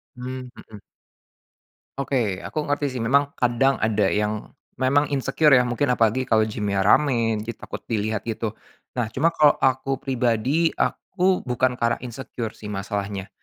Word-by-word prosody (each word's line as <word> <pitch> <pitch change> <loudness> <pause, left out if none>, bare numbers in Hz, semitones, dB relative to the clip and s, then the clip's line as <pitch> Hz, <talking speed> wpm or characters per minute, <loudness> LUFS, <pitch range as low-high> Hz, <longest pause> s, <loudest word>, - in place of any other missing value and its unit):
Mmm, 125 0 -6
mhm. 105 -2 -13 1.2
Oke 120 -8 -1
aku - - -8
ngerti 145 0 -1
sih - - -3
memang 140 +3 +5
kadang 125 +3 +2
ada 110 -3 +1
yang, 105 0 -1 0.3
memang 140 +3 +3
insecure 145 +2 +3
ya 125 - +7
mungkin 125 +3 0
apalagi 115 +2 +2
kalau 110 -3 +3
gym 105 -1 -2
ramai 115 +3 +3
jadi 115 - -4
takut - - -8
dilihat 110 -1 -2
gitu, 110 -1 -3 0.4
nah 120 - +1
cuma 155 +7 +3
kalau 155 -3 +5
aku 135 +1 +1
pribadi 130 +5 +1
aku 185 0 0
bukan 125 0 0
karena 115 -1 +1
insecure 120 -2 -5
sih - - -12
masalahnya, 100 -1 -4
120 Hz, 145 wpm, -23 LUFS, 110-135 Hz, 1.2 s, ya